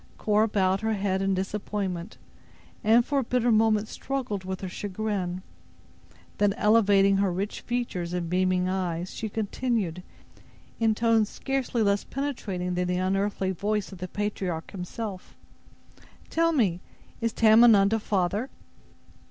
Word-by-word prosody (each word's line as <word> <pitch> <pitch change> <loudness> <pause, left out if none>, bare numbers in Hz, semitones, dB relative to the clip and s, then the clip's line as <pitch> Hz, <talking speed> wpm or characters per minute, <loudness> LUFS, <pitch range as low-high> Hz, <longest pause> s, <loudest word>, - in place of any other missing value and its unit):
Cora 215 +1 +2
bowed 195 -2 +1
her 220 0 0
head 195 -2 -1
in 195 0 +1
disappointment, 190 -1 -3 0.7
and, 230 +2 +5
for 285 -2 +1
a - - 0
bitter 245 0 +1
moment 215 -1 +3
struggled 245 -9 -4
with 185 0 -5
her 190 - -4
chagrin. 185 -1 -3 1.0
Then, 205 -1 +3
elevating 200 -2 +4
her 195 -1 +2
rich 195 +4 -3
features 235 -8 -3
and 180 -1 -2
beaming 185 +1 +1
eyes, 180 -2 -2
she 220 - -4
continued, 210 -4 -2 0.8
in 225 -2 +2
tones 225 -2 +2
scarcely 265 -4 -1
less 200 -1 +2
penetrating 200 -10 -3
than 180 0 -1
the 180 0 0
unearthly 195 +1 0
voice 205 +2 -2
of 190 - -10
the 185 - -4
patriarch 190 -5 -3
himself: 195 +1 -6 1.0
"Tell 330 0 +2
me, 200 - +1 0.4
is 230 0 +1
Tamenund 220 -2 +6
a 225 - +2
father?" 205 +4 -1
200 Hz, 135 wpm, -27 LUFS, 185-225 Hz, 1.0 s, Tamenund